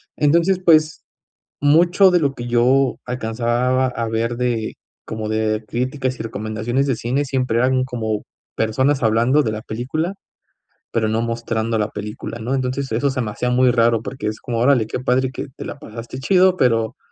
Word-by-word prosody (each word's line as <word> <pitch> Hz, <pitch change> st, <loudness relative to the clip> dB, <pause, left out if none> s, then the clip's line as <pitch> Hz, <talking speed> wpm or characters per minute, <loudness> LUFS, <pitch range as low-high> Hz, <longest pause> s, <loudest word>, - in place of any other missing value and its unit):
Entonces, 170 Hz, +5 st, +3 dB
pues, 155 Hz, -2 st, +4 dB, 0.6 s
mucho 175 Hz, +6 st, +5 dB
de 175 Hz, -1 st, +3 dB
lo 140 Hz, -2 st, +1 dB
que 120 Hz, -, -6 dB
yo 125 Hz, +2 st, +3 dB
alcanzaba 125 Hz, +2 st, 0 dB
a 115 Hz, -2 st, -3 dB
ver 115 Hz, +1 st, -1 dB
de, 120 Hz, -3 st, -1 dB, 0.3 s
como 110 Hz, -1 st, -5 dB
de 110 Hz, 0 st, 0 dB
críticas 130 Hz, +2 st, -2 dB
y -, -, -4 dB
recomendaciones 110 Hz, +4 st, -2 dB
de 130 Hz, -4 st, 0 dB
cine 130 Hz, +6 st, -1 dB
siempre 130 Hz, -3 st, 0 dB
eran 130 Hz, +1 st, +2 dB
como 110 Hz, -4 st, -3 dB, 0.3 s
personas 130 Hz, +5 st, +1 dB
hablando 120 Hz, +6 st, +3 dB
de 110 Hz, -, -1 dB
la 110 Hz, -, -4 dB
película, 155 Hz, -, -3 dB, 0.8 s
pero 110 Hz, -2 st, 0 dB
no 110 Hz, +1 st, 0 dB
mostrando 115 Hz, -1 st, -2 dB
la 105 Hz, 0 st, -1 dB
película, 105 Hz, +2 st, -6 dB
¿no? 125 Hz, +5 st, -2 dB
Entonces, 130 Hz, 0 st, -2 dB
eso 140 Hz, +5 st, +1 dB
se 130 Hz, -1 st, -2 dB
me 110 Hz, -3 st, -2 dB
hacía 125 Hz, +3 st, -2 dB
muy 125 Hz, 0 st, +4 dB
raro 115 Hz, -1 st, +2 dB
porque 130 Hz, -1 st, -6 dB
es 110 Hz, 0 st, -3 dB
como: 120 Hz, -2 st, -3 dB
"Órale, 120 Hz, -3 st, +3 dB
qué -, -, -3 dB
padre 130 Hz, +1 st, +1 dB
que 130 Hz, -, -6 dB
te -, -, -7 dB
la -, -, -7 dB
pasaste 115 Hz, -1 st, -8 dB
chido, 185 Hz, +5 st, +4 dB
pero, 115 Hz, -5 st, +1 dB
125 Hz, 180 wpm, -20 LUFS, 115-135 Hz, 0.8 s, mucho